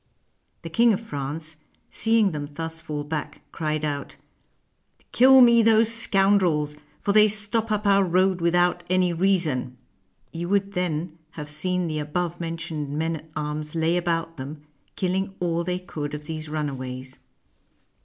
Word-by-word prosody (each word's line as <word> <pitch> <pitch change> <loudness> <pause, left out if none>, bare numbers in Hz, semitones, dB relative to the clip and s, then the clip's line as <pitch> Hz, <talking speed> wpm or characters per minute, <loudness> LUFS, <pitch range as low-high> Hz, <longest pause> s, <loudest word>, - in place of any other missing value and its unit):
The 165 - -6
King 235 +4 +4
of 190 - -1
France, 155 -4 -6 0.3
seeing 225 -3 +2
them 145 -2 -5
thus 165 0 -3
fall 150 -2 -4
back, 150 0 -5
cried 155 -1 -2
out, 145 -1 -4 0.5
" - - -39
Kill 260 +1 +7
me 235 -1 +7
those 225 0 +4
scoundrels; 195 -9 +2 0.3
for 200 - 0
they 215 0 +7
stop 215 +2 0
up 210 0 -1
our 200 -1 +5
road 185 0 +2
without 175 +1 +2
any 185 -1 +2
reason." 165 -9 0 0.6
You 170 +1 -4
would 200 0 +1
then 170 -2 -2 0.2
have 150 -1 -6
seen 180 +4 0
the 155 -2 -2
above 170 +3 -3
mentioned 165 -3 -4
men 160 +1 -1
at 160 +1 -15
arms 150 +1 -4
lay 165 +1 +1
about 165 -1 -1
them, 145 +3 -8 0.3
killing 190 +1 -1
all 170 -1 0
they 180 +1 -2
could 150 -5 -5
of 150 0 -9
these 155 0 -6
runaways. 130 -4 -5
165 Hz, 155 wpm, -24 LUFS, 150-190 Hz, 0.6 s, Kill